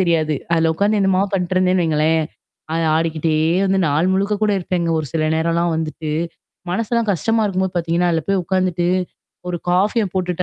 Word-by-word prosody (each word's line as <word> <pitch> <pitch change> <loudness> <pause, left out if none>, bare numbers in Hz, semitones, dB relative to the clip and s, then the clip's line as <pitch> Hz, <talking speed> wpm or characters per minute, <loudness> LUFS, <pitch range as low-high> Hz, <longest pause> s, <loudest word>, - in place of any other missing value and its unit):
தெரியாது. 160 -4 +1 0.2
அதுல 165 -1 +2
உட்கார்ந்து 205 +4 +1
என்னமா 190 -1 +2
பண்ணட்டுருந்தேன்னு 185 -1 +1
வைங்களேன். 160 +1 +2 0.5
அ - - 0 0.2
ஆடிக்கிட்டே 160 -1 0 0.3
வந்து 195 0 +2
நாள் 155 +5 +1
முழுக்க 200 +2 +1
கூட 210 -1 +3
இருப்பேங்க. 175 -1 -2
ஒரு 155 - -3
சில 155 -1 0
நேரம்லாம் 170 +1 +1
வந்துட்டு. 155 -1 -4 0.6
மனசெல்லாம் 230 +3 -1
கஷ்டமா 225 +6 0
இருக்கும்போது 190 -1 -1
பாத்தீங்கன்னா, 170 +1 +1
அதுல 160 - 0
போய் 195 -1 +2
உட்காந்துட்டு. 180 -2 0 0.6
ஒரு 175 - -2
காஃபிய 205 +5 +2
போட்டுட்டு 180 -1 -1
180 Hz, 155 wpm, -19 LUFS, 160-190 Hz, 0.6 s, கூட